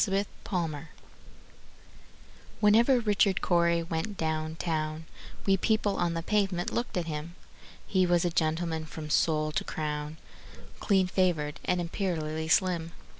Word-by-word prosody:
Richard 195 +1 +1 0.2
Cory 160 -6 -2 1.7
Whenever 230 +5 +5
Richard 205 -3 +2
Cory 170 -1 +2
went 165 +5 -3
down 155 0 -2
town, 155 -1 -2 0.4
We 195 -1 +4
people 215 0 +1
on 175 -1 0
the 165 - -3
pavement 195 -3 0
looked 235 -5 -2
at 175 - -1
him: 160 +2 -5 0.5
He 185 -2 +2
was 175 0 +3
a 175 - +1
gentleman 160 0 0
from 155 -1 -7
sole 155 0 +2
to - - -1
crown, 150 0 -4 0.6
Clean 195 -3 +3
favored, 175 -5 0
and 180 - +1
imperially 160 -3 -2
slim. 170 -1 +1
170 Hz, 130 wpm, -29 LUFS, 160-190 Hz, 1.7 s, Whenever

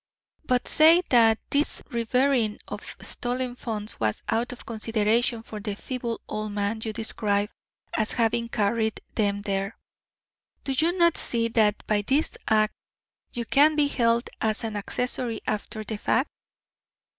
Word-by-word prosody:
But 250 -1 +1
say 325 +3 +6
that 225 -3 +6
this 290 +1 +2
reburying 235 -1 +1
of - - -7
stolen 245 0 -2
funds 215 -3 -4
was 110 -1 -1
out 230 +2 0
of 250 - -9
consideration 225 +1 0
for 215 -2 -8
the 205 0 -4
feeble 240 0 -4
old 215 -1 -4
man 205 +2 -1
you 220 - -2
describe 210 -2 -1 0.4
as 215 -1 0
having 235 0 +1
carried 220 +1 0
them 205 -2 0
there, 195 +1 -2 0.9
do 275 - -2
you 335 +6 +2
not 340 -2 +4
see 230 -1 0
that 215 -2 +2
by 210 -1 +1
this 270 +9 +1
act 215 0 +3 0.6
you 235 -1 -3
can 295 +5 +5
be 295 -1 +4
held 235 -3 +1
as 220 +1 0
an 220 -2 -3
accessory 235 +2 -2
after 215 +1 -3
the 215 0 -5
fact?" - - +1
225 Hz, 145 wpm, -26 LUFS, 215-250 Hz, 0.9 s, say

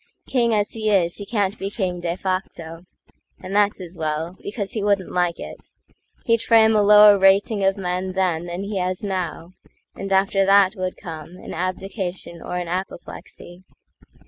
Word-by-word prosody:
King 240 -3 +1
as 210 -1 +1
he 220 -1 -2
is, 175 -4 +2
he 205 - -7
can't 205 -3 -1
be 195 - -3
king 185 -4 -3
de 175 0 -3
facto, 180 -3 -4 0.5
And 190 +2 -6
that's 205 0 +2
as 180 -1 -9
well, 160 +2 -3
because 200 -1 -5
he 225 -4 -3
wouldn't 200 -2 +1
like 175 -1 0
it; - - -9 0.6
He'd 230 -1 +2
frame 225 -1 +5
a 210 - +4
lower 210 0 +7
rating 195 +2 +3
of 195 +1 +2
men 185 0 -2
thenThan 175 -1 -1
he 200 0 -4
has 185 +1 -2
now; 185 -3 -4 0.4
and 195 0 -7
after 195 0 +3
that 195 0 +5
would 185 -1 -4
comeAn 165 0 -9
abdication 185 -1 -4
or 180 - -4
an 175 -1 -3
apoplexy. 180 0 -7
190 Hz, 165 wpm, -22 LUFS, 180-205 Hz, 0.6 s, lower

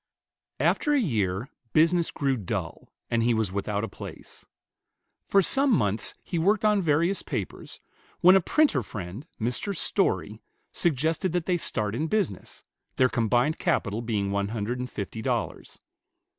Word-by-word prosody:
After 295 -1 +2
a - - +4
year, 110 - 0 0.3
business 165 +2 +4
grew 135 -2 0
dull, 100 -8 -5 0.2
and 115 -1 +2
he 120 0 +2
was 110 -4 0
without 100 +1 -2
a - - -1
place. - - -10 0.8
For 195 -1 +4
some 275 +8 +2
months 105 - 0
he 170 - -2
worked 205 +5 +2
on 210 -2 +4
various 170 +4 +2
papers, - - -5 0.4
when 185 +2 +7
a 190 - +5
printer 295 - +3
friend, 105 - -7
Mr. 125 - -1
Story, - - 0 0.3
suggested 160 +2 0
that 175 -2 0
they 180 - +2
start 105 -10 -1
in 150 +8 -1
business, 195 - -2 0.3
their 130 0 +4
combined 120 +6 +1
capital 105 +1 0
being 105 -4 -1
one 100 0 0
hundred 115 +3 -3
and 125 0 -4
fifty 110 0 -5
dollars. 120 -4 -3
125 Hz, 150 wpm, -27 LUFS, 105-175 Hz, 0.8 s, when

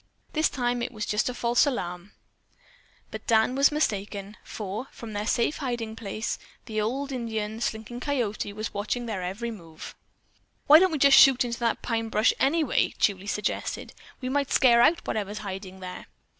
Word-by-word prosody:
This 310 0 +2
time 245 -1 -1
it 240 - -3
was 215 -3 -4
just 210 +4 0
a - - -3
false 240 +4 +3
alarm." 180 -7 -4 1.0
But - - -8
Dan 220 +2 +3
was 275 +2 +4
mistaken, 205 -7 -2
for, 215 +4 -5
from 220 -3 -9
a 205 +1 -2
safe 235 +6 +1
hiding 240 -5 -3
place, 215 0 -4 0.3
the 215 -2 -2
old 270 +6 -2
Indian, 220 -3 -3
Slinking 225 +1 -3
Coyote, 245 -7 -2
was 215 +2 -5
watching 215 +4 -2
their 215 -5 -3
every 200 +6 -4
move. 165 -7 -10 0.7
"Why 305 +2 +9
don't 375 +1 +4
we 280 -3 +4
shoot 265 -2 +7
into 235 -1 -4
that 235 -1 0
pine 225 -1 -1
brush 215 +1 +3
anyway?" 300 +1 +2
Julie 200 -1 +1
suggested. 210 +1 -3 0.3
"We 255 - -3
might 280 +1 0
scare 235 -2 +5
out 330 +7 +3
whatever 210 -2 -2
is 210 - -6
hiding 190 -2 -7
there." 180 0 -8
225 Hz, 170 wpm, -26 LUFS, 205-255 Hz, 1.0 s, Why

